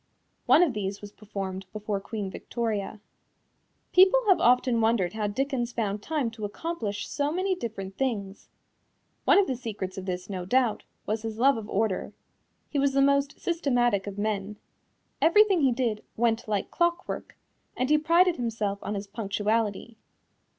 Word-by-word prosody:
One 355 - +7
of 310 -7 +1
these 200 -2 -3
was 205 -1 -10
performed 195 -3 -6
before 210 -1 -3
Queen 200 -1 -5
Victoria. 215 -3 -3 0.9
People 380 +6 +7
have 380 - +5
often 245 -1 +3
wondered 220 -6 +2
how 215 -1 -1
Dickens 250 +2 -1
found 210 -3 -2
time 290 -3 -1
to 225 -1 -10
accomplish 210 -2 -4
so 290 0 -1
many 375 +3 0
different 195 - -6
things. 210 -7 -3 0.8
One - - +6
of 400 - +5
the 265 - -2
secrets 200 -6 -5
of 190 - -8
this, 180 0 -3
no 185 -3 -4
doubt, 245 +4 +1 0.2
was 215 +1 -1
his 220 -1 -5
love 270 +4 +4
of 220 -1 -6
order. 205 -2 -1 0.5
He 285 - -2
was 275 0 +2
the 275 - +3
most 280 +1 +2
systematic 245 - +1
of 200 0 -6
men. 205 0 -2 0.6
Everything 390 +1 +5
he 270 -2 +4
did 235 -4 -1
"went 230 -1 +1
like 205 -2 -2
clockwork," 345 +1 -1 0.4
and 255 - +1
he 305 - +5
prided 340 +3 +4
himself 215 -4 -2
on 210 - -3
his 200 0 -4
punctuality. 215 +2 -2
225 Hz, 160 wpm, -27 LUFS, 205-275 Hz, 0.9 s, One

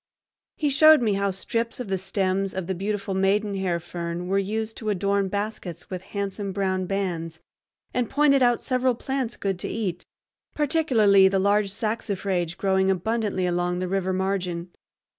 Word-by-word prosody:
He 295 -2 0
showed 310 +3 +7
me 215 -3 +2
how 200 0 +1
strips 230 +5 -3
of 250 - -4
the 190 -1 -1
stems 190 0 -1
of 190 -2 -3
the 190 - -2
beautiful 200 +1 -3
maidenhair 195 -2 +1
fern 170 0 -5
were 195 +1 +2
used 220 +3 -2
to 220 - -3
adorn 200 0 +1
baskets 200 -4 -5
with 185 -1 -4 0.2
handsome 200 0 -3
brown 185 -1 -1
bands, 170 -5 -3 0.5
and 245 -3 0
pointed 285 -2 +4
out 240 -1 +3
several 255 -1 +1
plants 265 -1 -3
good 195 -2 -2
to - - -3
eat, 185 -6 -3 0.5
particularly 245 -11 +4
the 195 0 +1
large 200 +1 +2
saxifrage 195 -5 -2
growing 190 -1 +2
abundantly 195 0 0
along 175 0 0
the 185 0 -2
river 190 0 0
margin. 185 -2 -2
195 Hz, 160 wpm, -25 LUFS, 185-220 Hz, 0.5 s, showed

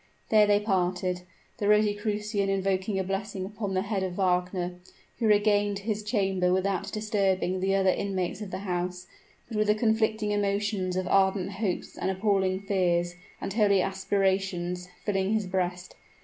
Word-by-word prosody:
There 215 -1 +6
they 205 0 +4
parted, 180 -3 0 0.4
the 205 - 0
Rosicrucian 210 -1 +1
invoking 195 +1 0
a 190 - 0
blessing 195 0 -3
upon 205 -1 -4
the 185 - +1
head 200 -1 -2
of 185 -1 -2
Wagner, 180 -1 0 0.4
who 230 - +2
regained 205 -1 +3
his 215 -2 -1
chamber 195 -4 +1
without 195 +1 0
disturbing 195 -4 0
the 195 +1 +1
other 190 -1 +4
inmates 190 0 -2
of 210 - -5
the - - -4
house: 180 0 -2 0.4
but 225 - -5
with 215 0 +2
the 210 - +4
conflicting 220 -1 +1
emotions 200 -2 0
of 185 0 -1
ardent 190 0 +2
hopes 195 -2 -3
and 190 - -1
appalling 190 -1 +1
fears, 175 -3 +1 0.3
and 195 - -4
holy 205 -3 +4
aspirations, 190 -2 -1 0.2
filling 195 0 +1
his 215 -2 +1
breast. 180 -1 -2
195 Hz, 155 wpm, -28 LUFS, 185-205 Hz, 0.4 s, There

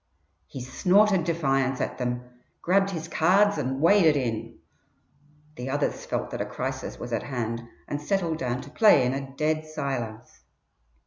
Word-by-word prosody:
He 130 - -8
snorted 190 +7 +3
defiance 135 -6 +1
at - - -3
them, 125 0 -2 0.4
grabbed 195 +2 +3
his 165 -4 -5
cards 190 +3 +3
and 135 -1 -2
waded 165 -1 +5
in. 115 -5 -3 1.0
The 125 +2 -5
others 145 +2 -2
felt - - -2
that - - -3
a - - -1
crisis - - -4
was 120 - -6
at 115 - 0
hand 115 -4 -3 0.3
and 145 - -3
settled 170 -1 -1
down 125 -2 -2
to 140 +2 -12
play 180 - +5
in 125 - 0
a 135 0 -5
dead 155 0 0
silence. 125 -7 -5
145 Hz, 155 wpm, -26 LUFS, 125-170 Hz, 1.0 s, waded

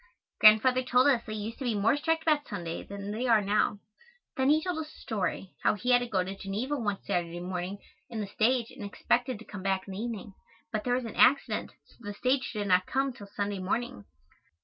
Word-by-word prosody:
Grandfather 220 +4 +7
told 250 0 +3
us 265 -5 +4
they 215 - -4
used 215 +2 -5
to - - -4
be 240 -4 0
more 210 +5 +3
strict 320 +2 0
about 305 -2 +2
Sunday 170 -6 -4
than 200 0 -7
they 235 +4 -2
are 230 -2 +6
now. 205 +1 +1 0.6
Then 265 +1 +2
he 310 +1 +4
told 360 -3 -2
us 310 -1 -6
a - - -16
story, 195 -3 -3
how - - +3
he 250 +4 -1
had 245 - +7
to 245 - -3
go 190 -5 +1
to 190 +2 -6
Geneva 210 +9 -3
one 205 -7 -1
Saturday 175 -1 -2
morning 180 +2 -4 0.3
in 230 -2 -5
the 210 - -2
stage 230 +4 +1
and - - -9
expected 240 +4 0
to 220 - -13
come 205 -2 -8
back 190 0 -1
in 195 - -6
the 190 - -5
evening, 220 -3 -5 0.4
but 215 -1 -2
there 245 0 +1
was 250 -1 -2
an 225 - -7
accident, 275 +2 +3
so - - -24
the 205 -3 -7
stage 255 +4 0
did 210 -2 -3
not 185 -1 +3
come 270 0 0
till 210 -5 -11
Sunday 200 0 -3
morning. 185 - -3
220 Hz, 230 wpm, -29 LUFS, 200-255 Hz, 0.6 s, Grandfather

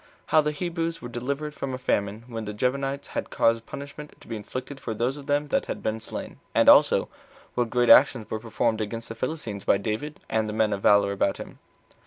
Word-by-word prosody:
How 155 0 +4
The 150 - 0
Hebrews 165 +1 -3
Were 120 - -7
Delivered 140 +5 -3
From 135 -3 -4
A - - -5
Famine 105 -3 -1
When 115 -3 -6
The 105 0 -5
Gibeonites 135 +3 -1
Had - - -4
Caused 115 0 +1
Punishment 140 +1 -9
To - - -17
Be 115 - -4
Inflicted 130 +6 -6
For 115 -4 -4
Those 120 +5 0
Of 145 -1 -11
Them 145 +1 +1
That - - 0
Had - - -5
Been 110 +1 -1
Slain: 110 - -7 0.2
As - - +4
Also, - - +7 0.5
What 120 -2 0
Great 120 +1 +4
Actions 125 -5 +6
Were 110 - -2
Performed 115 0 -1
Against 115 +2 -5
The - - -4
Philistines 115 - -4
By - - +4
David, 110 +9 -4
And 110 -1 0
The - - -4
Men 110 -1 +2
Of 100 - -3
Valor 100 0 +5
About 100 0 0
Him. - - -10
120 Hz, 220 wpm, -26 LUFS, 110-140 Hz, 0.5 s, Also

